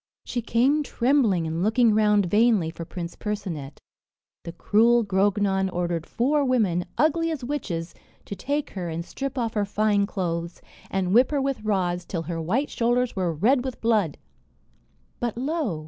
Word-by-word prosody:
She 245 - -3
came 255 +6 +2
trembling 240 - +1
and 160 +1 -2
looking 225 +3 +3
round 210 -2 +3
vainly 205 -3 +3
for 165 - -8
Prince 170 0 -6
Percinet. 185 -10 -5 0.7
The 170 - -5
cruel 230 +7 +3
Grognon 195 0 +1
ordered 175 -2 -2
four 285 +5 +1
women, 210 -10 +1
ugly 330 +2 +2
as 310 -5 -4
witches, 205 -12 -4 0.3
to 200 - -6
take 285 +9 -2
her 180 -3 -4
and 165 +1 -4
strip 275 +5 -5
off 230 -3 -1
her 210 - +1
fine 205 0 +1
clothes, 170 -3 -3 0.3
and 190 -1 -1
whip 245 +3 +5
her 290 - 0
with 275 -2 -1
rods 185 -4 0
till 170 -3 -4
her 165 0 -4
white 230 - -1
shoulders 240 +1 0
were 185 -3 0
red 235 - +2
with 260 -2 -5
blood. 215 -9 +1 1.0
But 240 -2 -2
lo! 265 - -2
210 Hz, 160 wpm, -25 LUFS, 175-250 Hz, 1.0 s, whip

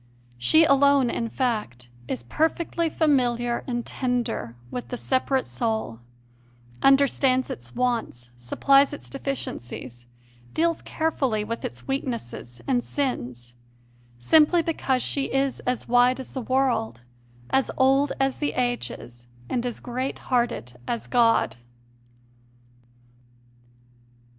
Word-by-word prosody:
She 315 - +5
alone, 280 -3 +4
in 230 -1 -2
fact, 210 - -2 0.2
is 120 -2 -3
perfectly 325 - 0
familiar 245 -6 +1
and 240 -2 -2
tender 245 - -2 0.2
with 245 - -5
the 245 - -5
separate 260 +1 0
soul, 220 - -2 0.8
understands 270 -1 +3
its 120 0 -8
wants, 185 - -2
supplies 275 - +3
its 290 - -8
deficiencies, 125 - -5 0.5
deals 335 0 +1
carefully 270 -9 -1
with 230 +2 -5
its - - -6
weaknesses 235 - -4
and 245 -3 +2
sins; 120 - -3 0.6
simply 310 - +4
because 265 -6 0
she 275 -1 -1
is 270 0 0
as 250 -1 -1
wide 245 +2 +4
as 260 - -7
the 260 - -4
world, 240 - 0 0.5
as 265 0 +2
old 270 +2 +4
as 270 -1 0
the 295 - -1
ages, 240 - -3 0.2
and 240 - 0
as 240 - -4
great 255 +2 -3
hearted 235 - -1
as 235 - -2
God. 230 - +3
250 Hz, 115 wpm, -25 LUFS, 215-275 Hz, 0.8 s, She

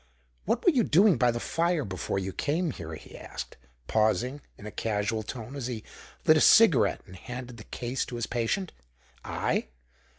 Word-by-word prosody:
"What 240 - 0
were 360 - +7
you 255 -7 +3
doing 190 +3 +5
by 125 - +4
the 120 0 -1
fire 165 +1 0
before 95 -1 -3
you 95 -1 -3
came 160 - 0
here?" 80 -7 -7
he 75 - -13
asked, - - -7 0.3
pausing, 115 - +1 0.2
in 105 - -12
a 105 - -6
casual 110 +1 -1
tone, 115 +4 -7
as 135 -4 -4
he 115 -4 -5 0.4
lit - - +7
a - - +3
cigarette - - +6
and 90 - -13
handed 125 +5 -8
the 110 - -11
case 125 +1 -3
to 125 - -7
his 120 -1 -2
patient. 120 - -1 0.5
"I? - - -1
120 Hz, 185 wpm, -28 LUFS, 105-145 Hz, 0.5 s, were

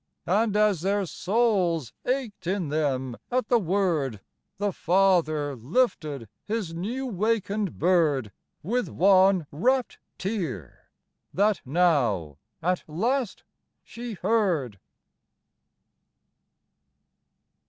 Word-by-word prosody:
And 205 +4 +1
as 210 -6 +3
their 200 +2 0
souls 185 - 0
ached 250 -8 -2
in 185 -4 -1
them 130 -5 -1
at 250 -2 -1
the 240 - +4
word, 170 - 0 0.4
The 205 0 -1
father 165 -6 +2
lifted 145 - -1 0.2
his 210 -6 -3
new 225 +11 -3
wakened 210 -3 -1
bird 155 - +2 0.3
With 240 +8 -1
one 190 -2 +4
rapt 250 - 0 0.2
tear, 165 - -5 0.5
that 205 +1 +2
now 125 - +1 0.2
at 180 +1 0
last 230 - -1 0.4
she 235 0 -7
heard! 175 - 0
185 Hz, 90 wpm, -26 LUFS, 150-215 Hz, 0.5 s, the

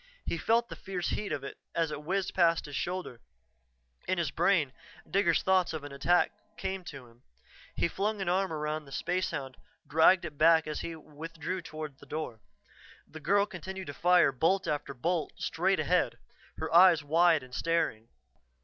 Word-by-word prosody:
He - - -1
felt 230 +6 +2
the - - -6
fierce 185 -3 -4
heat 210 - -3
of 140 - -3
it 140 - -8 0.2
as 165 -2 +1
it 150 - -5
whizzed 190 +4 -1
past 170 -2 +3
his 145 -2 -7
shoulder; 180 -9 -4 0.9
in 185 - +1
his 165 -5 -1
brain 165 -6 +2 0.3
Digger's 185 -4 +2
thoughts 185 -2 +2
of 155 -2 -5
attack 145 +5 +2 0.3
came 190 -4 -3
to 140 -6 -9
him, 120 0 -21 0.5
he - - +1
flung 205 +5 -2
an 190 - -3
arm 190 +1 +1
around 155 0 -3
the 140 - -14
spacehound, 140 -5 -2 0.3
dragged 165 +4 +4
it 150 -3 -8
back 160 0 +6
as 155 -1 -4
he 165 - -5
withdrew 160 +3 -6
toward 155 -4 -8
the - - -15
door. 155 -8 -5 0.7
The 160 - -10
girl 200 +6 +3
continued 190 0 -7
to 145 - -6
fire 175 -1 +4
bolt 165 +9 +1
after 145 -2 -2
bolt 165 +3 -1
straight 185 +2 0
ahead, 150 -3 +1 0.4
her - - -4
eyes 170 -2 +7
wide 160 0 +4
and 130 -1 -14
staring. 160 -9 0
165 Hz, 175 wpm, -30 LUFS, 150-185 Hz, 0.9 s, eyes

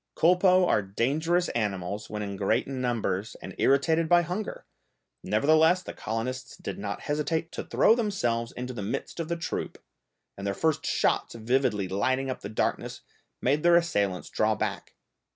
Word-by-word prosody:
Culpeux 180 +2 +5
are 105 - +3
dangerous 150 - 0
animals 100 -2 -3
when 105 0 -4
in 100 -1 -4
great 95 0 +1
numbers 120 -6 -2
and - - -8
irritated 160 +4 +3
by 175 0 +6
hunger, 185 +5 -5 0.6
nevertheless 160 +10 +4
the - - -7
colonists 125 +4 -4
did - - -6
not - - -4
hesitate 160 +2 -1
to - - -5
throw - - +4
themselves 130 - -1
into 125 +1 -5
the 115 - -5
midst 105 - -4
of 165 - -2
the 170 0 -2
troop, 170 - -4 0.6
and 100 0 -5
their 100 - -1
first 160 -2 0
shots - - +1
vividly 115 -4 +1
lighting 130 +8 0
up - - -6
the 100 - -6
darkness 110 - -2 0.4
made 140 +4 +2
their 175 +1 +5
assailants 100 - +1
draw - - +2
back. - - -4
130 Hz, 160 wpm, -27 LUFS, 105-165 Hz, 0.6 s, by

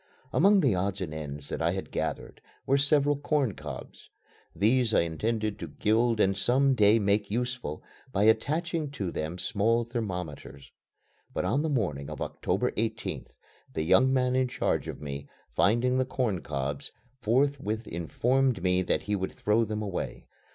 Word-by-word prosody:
Among 200 +3 +5
the 130 - +3
odds 95 +1 -1
and 85 -5 -4
ends 75 -2 -6
that - - -3
I - - +2
had - - -5
gathered - - -4 0.2
were 135 - +3
several 145 0 +3
corn 145 -5 0
cobs. - - -9 0.5
These 115 +2 +3
I - - +5
intended 105 +6 -1
to - - -5
gild 115 +1 +1
and 95 -1 +3
some 130 +7 +3
day 105 -2 +5
make 100 -1 +1
useful 125 - -3 0.3
by 100 -2 +1
attaching 155 +8 +1
to 95 -10 -3
them 80 +3 -4
small 115 +5 +1
thermometers. 90 - -5 0.6
But - - -2
on 130 +10 +1
the 160 - -1
morning 85 - -1
of - - -7
October - - -1
18th, - - -3 0.4
the 80 - -2
young 130 +11 +5
man 130 -1 +2
in 130 0 +2
charge 125 - -1
of - - -6
me, 70 0 -6 0.3
finding 120 +5 +3
the 130 - +2
corn 120 -8 -1
cobs, 70 -1 -4 0.3
forthwith 120 -2 +1
informed 120 - 0
me 90 0 +3
that 95 - 0
he 105 - -1
would 95 -1 -3
throw 105 +2 +2
them 105 0 -3
away. 100 -3 -4
110 Hz, 165 wpm, -28 LUFS, 90-130 Hz, 0.6 s, Among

